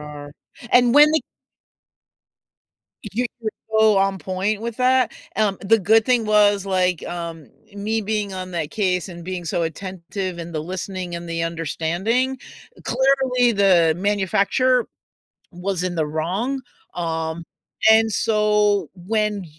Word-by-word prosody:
are, 145 Hz, -1 st, -9 dB, 0.4 s
and 245 Hz, 0 st, +5 dB
when 295 Hz, +1 st, +8 dB
they 315 Hz, -, +1 dB, 1.9 s
You 245 Hz, +5 st, -1 dB, 0.2 s
are -, -, +1 dB, 0.3 s
so 215 Hz, -2 st, +5 dB
on 195 Hz, 0 st, +1 dB
point 195 Hz, +4 st, -2 dB
with 235 Hz, -1 st, -5 dB
that, 255 Hz, -1 st, +2 dB, 0.2 s
um, 205 Hz, -3 st, +1 dB
the 225 Hz, +3 st, +3 dB
good 220 Hz, +3 st, +4 dB
thing 245 Hz, -2 st, +2 dB
was, 205 Hz, -2 st, +3 dB
like, 185 Hz, -3 st, 0 dB
um, 165 Hz, -4 st, -6 dB, 0.3 s
me 215 Hz, +2 st, -2 dB
being 210 Hz, -1 st, -2 dB
on 185 Hz, 0 st, -6 dB
that 165 Hz, -3 st, -3 dB
case 185 Hz, -3 st, -1 dB
and 170 Hz, -2 st, -9 dB
being 185 Hz, -1 st, -5 dB
so 170 Hz, +1 st, -1 dB
attentive 185 Hz, +2 st, -5 dB
in 170 Hz, 0 st, -7 dB
the 155 Hz, -, -2 dB
listening 185 Hz, 0 st, -5 dB
and 170 Hz, 0 st, -6 dB
the 165 Hz, 0 st, -2 dB
understanding, 170 Hz, -, -1 dB, 0.5 s
clearly 260 Hz, -1 st, +2 dB
the 180 Hz, -6 st, +4 dB
manufacturer 205 Hz, +6 st, +1 dB, 0.7 s
was 180 Hz, 0 st, -3 dB
in 180 Hz, -1 st, -2 dB
the 160 Hz, -2 st, 0 dB
wrong, 190 Hz, -, -2 dB, 0.3 s
um, 165 Hz, -1 st, -3 dB, 0.5 s
and 220 Hz, 0 st, +5 dB
so 210 Hz, -4 st, +2 dB
when 210 Hz, +1 st, -1 dB
195 Hz, 135 wpm, -21 LUFS, 170-220 Hz, 1.9 s, when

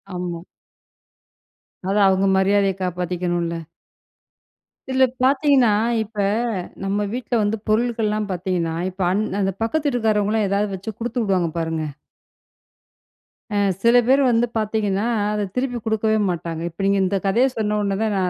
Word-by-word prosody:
ஆமா. 175 Hz, -2 st, -4 dB, 1.6 s
அவங்க 190 Hz, 0 st, +3 dB
மரியாதைய 195 Hz, 0 st, +3 dB
காப்பாத்திக்கணும்ல! 175 Hz, -2 st, -2 dB, 1.3 s
இதில 260 Hz, 0 st, +3 dB, 0.2 s
பார்த்தீங்கன்னா 265 Hz, -4 st, +4 dB, 0.3 s
இப்ப, 215 Hz, 0 st, -16 dB, 0.7 s
நம்ம 200 Hz, +1 st, 0 dB
வீட்ல 245 Hz, 0 st, -2 dB
வந்து 205 Hz, +2 st, 0 dB
பொருள்கள்லாம் 215 Hz, -2 st, 0 dB
பார்த்தீங்கன்னா, 175 Hz, -2 st, -2 dB, 0.2 s
இப்ப 190 Hz, +1 st, -9 dB
அந் 205 Hz, +3 st, +1 dB, 0.2 s
அந்த 195 Hz, 0 st, 0 dB
பக்கத்து 300 Hz, +7 st, -1 dB
வீட்டுக்காரவங்கலாம் 220 Hz, -4 st, +1 dB
எதாவது 200 Hz, +1 st, 0 dB
வச்சு 195 Hz, +4 st, -6 dB
குடுத்து 240 Hz, +1 st, -2 dB
விடுவாங்க 185 Hz, -5 st, +1 dB
பாருங்க. 160 Hz, -1 st, -2 dB, 1.7 s
ஆ -, -, -2 dB, 0.3 s
சில 235 Hz, +1 st, +5 dB
பேர் 270 Hz, +2 st, +5 dB
வந்து 235 Hz, +1 st, +2 dB
பார்த்தீங்கன்னா 210 Hz, -2 st, 0 dB, 0.3 s
அத 210 Hz, -1 st, -1 dB
திருப்பி 250 Hz, -1 st, -1 dB
குடுக்கவே 220 Hz, 0 st, +1 dB
மாட்டாங்க. 165 Hz, -2 st, -4 dB
இப்ப 170 Hz, +4 st, -7 dB
நீங்க 200 Hz, 0 st, +3 dB
இந்த 195 Hz, +2 st, 0 dB
கதைய 230 Hz, +7 st, +3 dB
சொன்ன 210 Hz, -1 st, 0 dB
உடனே 200 Hz, -1 st, 0 dB
தான் 220 Hz, -1 st, 0 dB
நான் 185 Hz, -1 st, +1 dB
205 Hz, 130 wpm, -21 LUFS, 185-225 Hz, 1.7 s, சில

